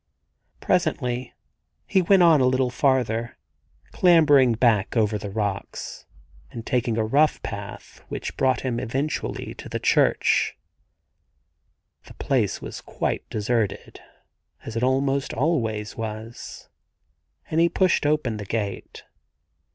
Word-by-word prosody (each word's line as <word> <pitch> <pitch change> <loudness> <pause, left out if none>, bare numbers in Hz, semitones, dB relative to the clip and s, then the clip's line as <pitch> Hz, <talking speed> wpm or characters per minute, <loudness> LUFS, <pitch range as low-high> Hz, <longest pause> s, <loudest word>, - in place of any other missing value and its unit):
Presently 125 -8 0 0.5
he 190 - +2
went 185 +1 +4
on 160 -5 +6
a 125 - +4
little 130 -1 +1
farther, 120 -3 0 0.5
clambering 145 -8 +5
back 115 -2 +2
over 110 -1 +2
the 105 - -6
rocks, 100 -1 -4 0.4
and 115 -1 -8
taking 120 -2 0
a 110 - +1
rough 145 +7 +2
path - - -8
which - - -5
brought 130 -1 +1
him 125 -3 -2
eventually 135 +7 -3
to - - -10
the - - -2
church. - - +2 1.5
The - - -14
place - - -1
was - - -7
quite - - -3
deserted, 110 -1 -2 0.7
as 115 - -7
it 115 - -1
almost 135 +1 0
always 115 -7 -1
was, 110 +1 -7 0.8
and 160 - +1
he 170 - +4
pushed 185 -5 +2
open 145 -7 0
the 105 - -6
gate. 100 -1 -4
125 Hz, 120 wpm, -24 LUFS, 110-145 Hz, 1.5 s, on